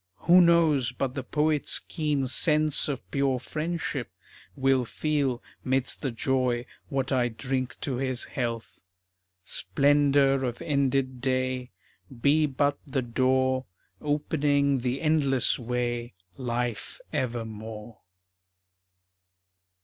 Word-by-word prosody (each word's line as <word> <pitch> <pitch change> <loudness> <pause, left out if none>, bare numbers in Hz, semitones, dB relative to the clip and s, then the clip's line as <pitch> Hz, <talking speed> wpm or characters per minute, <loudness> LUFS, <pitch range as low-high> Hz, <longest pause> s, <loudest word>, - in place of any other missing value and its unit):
Who 180 +2 +7
knows 160 -7 +4
but 130 0 -2
the 135 - -3
poet's 150 +2 +1
keen 150 -4 -1
sense 150 +3 +2
of 135 -3 -4
pure 135 -2 +1
friendship 155 - -3 0.5
Will 135 -1 +2
feel, 135 -1 -1 0.2
'midst 130 0 -1
the 135 - -1
joy, 125 0 0 0.2
what 135 0 -1
I 125 -2 +2
drink 130 +2 -3
to 135 -5 -2
his 130 -1 -1
health? 115 -3 -4 0.7
Splendor 140 +6 +3
of 120 -2 -2
ended 135 -5 0
day 130 -1 -1 0.5
Be 150 +4 +4
but 145 +1 0
the 135 -1 -1
door 130 +1 +1 0.3
Opening 145 -2 +1
the 125 +2 -2
endless 140 -5 +2
way 120 -2 -2 0.2
Life 120 -2 -3
evermore. 110 -2 -4
130 Hz, 105 wpm, -27 LUFS, 125-145 Hz, 0.7 s, Who